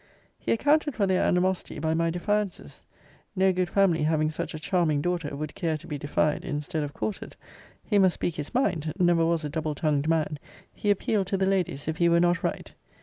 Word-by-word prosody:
He -, -, -2 dB
accounted 295 Hz, +4 st, +2 dB
for 205 Hz, -, +2 dB
their 190 Hz, -1 st, +2 dB
animosity 185 Hz, +1 st, 0 dB
by 160 Hz, +1 st, 0 dB
my 165 Hz, +1 st, +1 dB
defiances: 200 Hz, +3 st, -3 dB, 0.5 s
no 190 Hz, 0 st, +3 dB
good 180 Hz, -1 st, 0 dB
family, 195 Hz, -4 st, +3 dB
having 155 Hz, 0 st, +1 dB
such 155 Hz, -, -5 dB
a -, -, -5 dB
charming 160 Hz, -3 st, +1 dB
daughter, 170 Hz, -2 st, -2 dB
would 150 Hz, +1 st, -5 dB
care 160 Hz, -3 st, -1 dB
to 165 Hz, -, -14 dB
be 150 Hz, -4 st, -5 dB
defied, 145 Hz, +1 st, 0 dB
instead 150 Hz, +2 st, -3 dB
of 145 Hz, -1 st, -3 dB
courted: 210 Hz, +7 st, -5 dB, 0.5 s
he 205 Hz, -2 st, +2 dB
must 190 Hz, -2 st, +4 dB
speak 175 Hz, -, -2 dB
his 150 Hz, -1 st, -4 dB
mind: 165 Hz, -, 0 dB
never 175 Hz, -3 st, +3 dB
was 165 Hz, -1 st, +1 dB
a -, -, -3 dB
double 155 Hz, 0 st, -3 dB
tongued 150 Hz, -1 st, 0 dB
man. 155 Hz, -2 st, 0 dB, 0.3 s
He 205 Hz, -, -2 dB
appealed 205 Hz, -1 st, +1 dB
to 195 Hz, -, 0 dB
the 190 Hz, -, +1 dB
ladies, 185 Hz, -7 st, -1 dB
if 160 Hz, 0 st, -2 dB
he 170 Hz, -2 st, +3 dB
were 170 Hz, 0 st, +4 dB
not 175 Hz, 0 st, +2 dB
right? -, -, -3 dB
170 Hz, 205 wpm, -27 LUFS, 155-190 Hz, 0.5 s, must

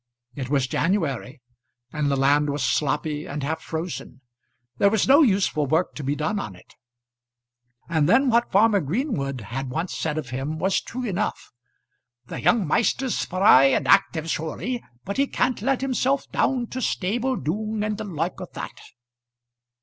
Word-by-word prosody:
It 130 Hz, -2 st, -5 dB
was 140 Hz, -2 st, +2 dB
January, 140 Hz, -, -1 dB, 0.5 s
and 150 Hz, -2 st, 0 dB
the 140 Hz, -, +1 dB
land 145 Hz, +2 st, +3 dB
was 145 Hz, -2 st, -2 dB
sloppy 150 Hz, +2 st, -1 dB
and 145 Hz, 0 st, -5 dB
half 160 Hz, +3 st, -2 dB
frozen. 160 Hz, -5 st, -6 dB, 0.6 s
There 200 Hz, -, +5 dB
was 215 Hz, -1 st, +1 dB
no 280 Hz, +4 st, +7 dB
useful 190 Hz, -, +2 dB
work 160 Hz, +6 st, +1 dB
to 150 Hz, -, -7 dB
be 140 Hz, +2 st, -1 dB
done 200 Hz, +8 st, -1 dB
on 100 Hz, -, -6 dB
it. 90 Hz, -, -19 dB, 1.1 s
And 160 Hz, -2 st, +1 dB
then 265 Hz, +7 st, +5 dB
what 235 Hz, +1 st, +2 dB
farmer 205 Hz, +1 st, +4 dB
Greenwood 145 Hz, -, -2 dB
had 125 Hz, +6 st, -5 dB
once 165 Hz, +7 st, -3 dB
said 155 Hz, -1 st, -2 dB
of 130 Hz, -6 st, -5 dB
him 135 Hz, +5 st, -3 dB
was 190 Hz, +4 st, +1 dB
true 250 Hz, +1 st, -6 dB
enough, 205 Hz, -2 st, -3 dB, 0.7 s
"The -, -, -6 dB
young 215 Hz, -4 st, +3 dB
maister's 245 Hz, -, +1 dB
spry 185 Hz, -8 st, +5 dB
and 135 Hz, -, +2 dB
active 160 Hz, -1 st, +3 dB
surely, 170 Hz, +10 st, -3 dB, 0.2 s
but 200 Hz, -, -4 dB
he 275 Hz, +1 st, +2 dB
can't 255 Hz, -1 st, 0 dB
let 270 Hz, -1 st, 0 dB
unself 270 Hz, +1 st, 0 dB
down 255 Hz, -3 st, +1 dB
to 255 Hz, -, -4 dB
stable 240 Hz, +6 st, 0 dB
doong 210 Hz, -, -2 dB
and 215 Hz, 0 st, -2 dB
the -, -, -3 dB
loik 175 Hz, -3 st, -3 dB
o' -, -, -6 dB
that." -, -, -7 dB
165 Hz, 165 wpm, -24 LUFS, 145-220 Hz, 1.1 s, no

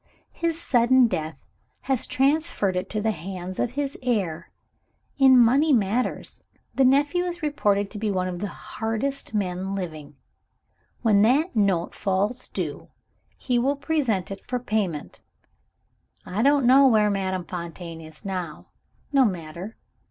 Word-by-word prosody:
His 335 Hz, -1 st, -2 dB
sudden 255 Hz, -3 st, +4 dB
death 160 Hz, -, -4 dB, 0.4 s
has 265 Hz, -3 st, -1 dB
transferred 275 Hz, -, +1 dB
it 185 Hz, +1 st, -2 dB
to 215 Hz, -, -2 dB
the 220 Hz, -, +2 dB
hands 185 Hz, 0 st, -7 dB
of 245 Hz, -, -1 dB
his 280 Hz, 0 st, -3 dB
heir. 190 Hz, -10 st, -1 dB, 0.7 s
In 265 Hz, -1 st, +7 dB
money 265 Hz, +6 st, +5 dB
matters, 230 Hz, 0 st, 0 dB, 0.3 s
the 270 Hz, -, +3 dB
nephew 285 Hz, +7 st, +3 dB
is 350 Hz, -1 st, -5 dB
reported 205 Hz, -9 st, +1 dB
to 210 Hz, -, -7 dB
be 215 Hz, 0 st, -1 dB
one 185 Hz, -2 st, 0 dB
of 180 Hz, -1 st, -4 dB
the 205 Hz, -, -2 dB
hardest 225 Hz, +7 st, -4 dB
men 190 Hz, -1 st, -2 dB
living. 155 Hz, -6 st, -6 dB, 0.9 s
When 210 Hz, -3 st, +4 dB
that 275 Hz, -, +3 dB
note 195 Hz, -5 st, +1 dB
falls 205 Hz, +5 st, -1 dB
due, -, -, -5 dB, 0.5 s
he 245 Hz, -2 st, 0 dB
will 275 Hz, +4 st, +1 dB
present 270 Hz, -, -1 dB
it 195 Hz, -, -7 dB
for 250 Hz, -, -2 dB
payment. 210 Hz, -10 st, -3 dB, 1.1 s
I 200 Hz, +4 st, -2 dB
don't 280 Hz, +1 st, +4 dB
know 270 Hz, +2 st, +7 dB
where 215 Hz, -4 st, +4 dB
Madame 190 Hz, -2 st, -2 dB
Fontaine 170 Hz, -1 st, -7 dB
is 160 Hz, +4 st, -13 dB
now. 180 Hz, -5 st, -5 dB, 0.4 s
No 275 Hz, -1 st, +6 dB
matter! 180 Hz, 0 st, -4 dB
215 Hz, 145 wpm, -24 LUFS, 185-260 Hz, 1.1 s, In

